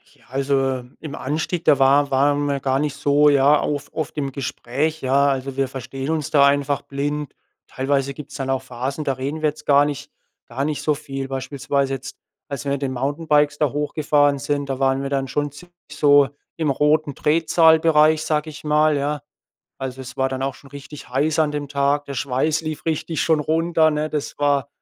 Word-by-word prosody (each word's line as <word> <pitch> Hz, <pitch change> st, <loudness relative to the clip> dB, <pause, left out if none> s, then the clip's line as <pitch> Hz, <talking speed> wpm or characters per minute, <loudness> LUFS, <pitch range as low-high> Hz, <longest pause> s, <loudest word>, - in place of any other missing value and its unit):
Ja, -, -, -26 dB
also, 135 Hz, -1 st, 0 dB, 0.2 s
im 150 Hz, -3 st, -7 dB
Anstieg, 155 Hz, +5 st, -3 dB
da 140 Hz, -, +5 dB
wa 140 Hz, +2 st, +4 dB
waren 145 Hz, +2 st, +2 dB
wir 140 Hz, -1 st, -1 dB
gar 135 Hz, 0 st, 0 dB
nicht 150 Hz, -2 st, -1 dB
so, 145 Hz, +1 st, +4 dB
ja, 140 Hz, +1 st, +5 dB
auf 145 Hz, -1 st, -3 dB
oft 155 Hz, -1 st, -4 dB
im 140 Hz, -2 st, -2 dB
Gespräch, 140 Hz, +4 st, -3 dB
ja? 135 Hz, +2 st, +3 dB
Also, 135 Hz, 0 st, -3 dB
wir 135 Hz, -1 st, +1 dB
verstehen 135 Hz, +1 st, -6 dB
uns 155 Hz, -3 st, -2 dB
da 140 Hz, -2 st, +6 dB
einfach 140 Hz, 0 st, +1 dB
blind. 145 Hz, +1 st, -3 dB, 0.3 s
Teilweise 135 Hz, +1 st, -1 dB
gibt's 150 Hz, +1 st, -10 dB
dann 135 Hz, -1 st, -4 dB
auch 135 Hz, -1 st, 0 dB
Phasen, 130 Hz, +5 st, -4 dB
da 135 Hz, -, 0 dB
reden 140 Hz, +4 st, -4 dB
wir 155 Hz, -, +3 dB
jetzt 150 Hz, -, -11 dB
gar 145 Hz, 0 st, +5 dB
nicht 145 Hz, -2 st, -5 dB, 0.4 s
gar 130 Hz, +4 st, -3 dB
nicht 150 Hz, 0 st, -2 dB
so 150 Hz, -, +1 dB
viel. 135 Hz, -2 st, -6 dB
Beispielsweise 135 Hz, +1 st, -2 dB
jetzt, 135 Hz, 0 st, -9 dB, 0.3 s
als 140 Hz, -4 st, -5 dB
wir 140 Hz, -, -2 dB
mit 140 Hz, 0 st, -2 dB
den 130 Hz, -1 st, -2 dB
Mountainbikes 145 Hz, +2 st, +1 dB
da 150 Hz, -4 st, +1 dB
hochgefahren 145 Hz, -1 st, +1 dB
sind, 145 Hz, 0 st, -2 dB
da 135 Hz, 0 st, -3 dB
waren 135 Hz, 0 st, +2 dB
wir 135 Hz, -, -3 dB
dann 135 Hz, -1 st, -1 dB
schon 145 Hz, +2 st, -2 dB
ziemlich 175 Hz, +4 st, -15 dB, 0.2 s
so 145 Hz, -2 st, +4 dB, 0.3 s
im 160 Hz, -3 st, -1 dB
roten 150 Hz, +1 st, +2 dB
Drehzahlbereich, 160 Hz, 0 st, +4 dB
sage 155 Hz, 0 st, -1 dB
ich 150 Hz, -, -11 dB
mal, 150 Hz, 0 st, +3 dB
ja? 145 Hz, +1 st, -2 dB, 0.6 s
Also, 130 Hz, -1 st, -5 dB
es 130 Hz, -, -9 dB
war 130 Hz, 0 st, +1 dB
dann 130 Hz, 0 st, -4 dB
auch 135 Hz, -1 st, -2 dB
schon 140 Hz, -, -17 dB
richtig 145 Hz, +1 st, -10 dB
heiß 145 Hz, +5 st, 0 dB
an 155 Hz, -1 st, +2 dB
dem 145 Hz, -1 st, -4 dB
Tag. 140 Hz, 0 st, +1 dB
Der 140 Hz, -, -7 dB
Schweiß 140 Hz, +5 st, 0 dB
lief 155 Hz, 0 st, -6 dB
richtig 160 Hz, -1 st, -1 dB
schon 160 Hz, -2 st, +2 dB
runter, 160 Hz, +1 st, +2 dB
ne? 150 Hz, 0 st, -1 dB
Das 150 Hz, -2 st, -4 dB
war 145 Hz, -1 st, +1 dB
145 Hz, 200 wpm, -21 LUFS, 135-150 Hz, 0.6 s, da